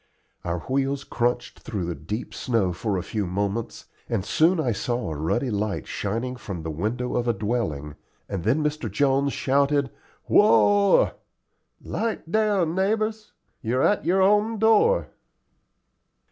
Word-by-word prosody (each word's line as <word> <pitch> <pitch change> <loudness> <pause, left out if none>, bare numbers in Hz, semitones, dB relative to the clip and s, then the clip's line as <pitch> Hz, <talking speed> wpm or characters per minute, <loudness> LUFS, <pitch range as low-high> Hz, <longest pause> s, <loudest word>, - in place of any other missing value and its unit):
Our 85 -1 -2
wheels 135 +1 -1
crunched 120 0 -2
through 100 -6 -4
the 85 - -2
deep 85 - -6
snow 110 -8 0
for 100 +2 -2
a 90 - -3
few 105 -1 -3
moments, 100 +5 -3 0.2
and 105 -5 -1
soon 165 - +3
I 130 -6 +1
saw 120 -1 -2
a - - -4
ruddy 100 - -1
light 105 0 -2
shining 115 +5 -3
from 95 -8 -6
the 80 - -3
window 110 +10 -2
of 120 0 0
a 120 - +3
dwelling, 95 - -2 0.3
and 95 -4 -4
then 130 +9 +2
Mr. 150 0 -2
Jones 140 0 +2
shouted, 140 0 +1 0.3
"Whoa! 205 -1 +5 0.7
'Light 220 -7 -3
down, 205 -6 +2
neighbors; 215 +3 -1 0.3
you're 125 +4 0
at 205 - +2
your 190 +2 +3
own 210 +3 +3
door." 225 - +3
125 Hz, 145 wpm, -25 LUFS, 100-170 Hz, 0.7 s, Whoa